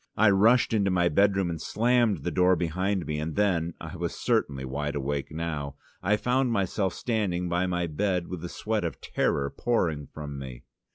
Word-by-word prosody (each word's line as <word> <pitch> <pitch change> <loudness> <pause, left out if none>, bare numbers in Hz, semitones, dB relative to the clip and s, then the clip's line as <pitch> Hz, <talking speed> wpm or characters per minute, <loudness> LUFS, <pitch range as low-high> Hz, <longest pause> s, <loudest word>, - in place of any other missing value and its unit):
I 105 0 +6
rushed 115 +6 +4
into 100 -3 +2
my 90 -2 +3
bedroom, 95 +1 +2
and 80 - -5
slammed 120 -2 +2
the - - -1
door 90 0 +4
behind 90 +3 -1
me, 75 -1 -2
and 80 +1 -3
then 85 -5 +1
I - - -8
was - - -3
certainly 65 -2 0
wide 75 +3 -3
awake 70 0 -2
now 75 -3 -4 0.3
I 105 +3 +2
found 125 +3 +1
myself 95 -2 0
standing 100 -7 -1
by 90 +2 0
my 90 -1 0
bed 90 +2 -1
with 90 -3 -6
the 90 - -5
sweat 110 +2 -2
of 85 - -4
terror 70 0 0
pouring 80 - 0
from 75 -2 -7
me. 65 -1 -8
90 Hz, 185 wpm, -27 LUFS, 75-105 Hz, 0.3 s, I